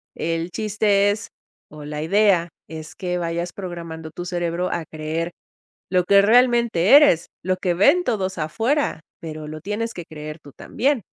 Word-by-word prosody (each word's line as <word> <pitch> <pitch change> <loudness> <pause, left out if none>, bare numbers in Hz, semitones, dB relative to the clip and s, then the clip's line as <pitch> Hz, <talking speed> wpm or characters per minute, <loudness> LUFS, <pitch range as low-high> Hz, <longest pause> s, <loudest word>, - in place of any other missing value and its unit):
El 165 +1 -2
chiste 205 0 +2
es 210 +2 -5 0.4
o 150 -1 -10
la 150 0 -5
idea 190 -1 +3 0.2
es 155 0 -8
que 180 -2 -3
vayas 170 0 -3
programando 170 -4 -7
tu 175 +3 -7
cerebro 175 0 -2
a 170 - -2
creer 160 +2 -4 0.6
lo 180 -1 +2
que 200 +2 +6
realmente 235 -2 +5
eres, 180 - +5 0.2
lo 185 0 0
que 180 -2 0
ven 275 - +4
todos 190 - -1
afuera. 225 - 0 0.2
Pero 155 -2 -7
lo 155 0 -7
tienes 210 +6 -3
que 175 - -7
creer 155 0 -8
tú 145 - -14
también. 270 -1 0
175 Hz, 160 wpm, -22 LUFS, 160-210 Hz, 0.6 s, que